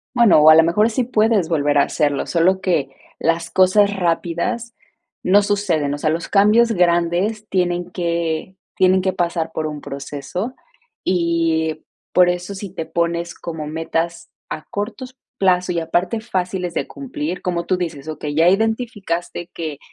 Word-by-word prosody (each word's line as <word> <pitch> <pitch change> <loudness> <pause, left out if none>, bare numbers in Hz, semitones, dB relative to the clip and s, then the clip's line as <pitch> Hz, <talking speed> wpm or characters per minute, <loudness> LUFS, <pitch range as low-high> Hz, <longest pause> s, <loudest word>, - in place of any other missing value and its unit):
Bueno, 235 -10 +6
o 155 - +9
a - - +9
lo 160 - +7
mejor 210 +7 +2
sí 245 +3 0
puedes 220 -6 +2
volver 145 -3 +1
a - - +6
hacerlo, 145 -3 0
solo 185 +3 +2
que 170 -8 0 0.3
las 165 0 0
cosas 200 +2 +4
rápidas 180 +7 -1 0.5
no 200 +3 +4
suceden, 195 -8 0
o - - -5
sea, 155 +1 0
los 165 +2 -2
cambios 215 +4 +4
grandes 180 +4 +1
tienen 175 -1 -1
que 170 0 -2 0.2
tienen 185 0 +4
que 190 0 0
pasar 170 -2 -1
por 160 -1 -2
un 150 -1 -5
proceso, 145 - -5 0.5
y 165 -3 0 0.3
por 180 -1 +5
eso 180 +2 -2
si 195 -1 -7
te 165 - -4
pones 170 0 -1
como 160 -3 -6
metas 165 +2 -3 0.2
a 155 - -5
cortos 250 +5 -5 0.2
plazo 180 -2 +2
y 170 - -2
aparte 175 +6 -1
fáciles 180 -5 -3
de - - -1
cumplir, 185 - -5
como 175 -1 -2
tú 185 - +1
dices, 160 -5 -5
okey, 150 -1 -5
ya 165 +3 +4
identificaste 195 -5 -1
que 155 -4 -5
175 Hz, 160 wpm, -20 LUFS, 165-195 Hz, 0.5 s, o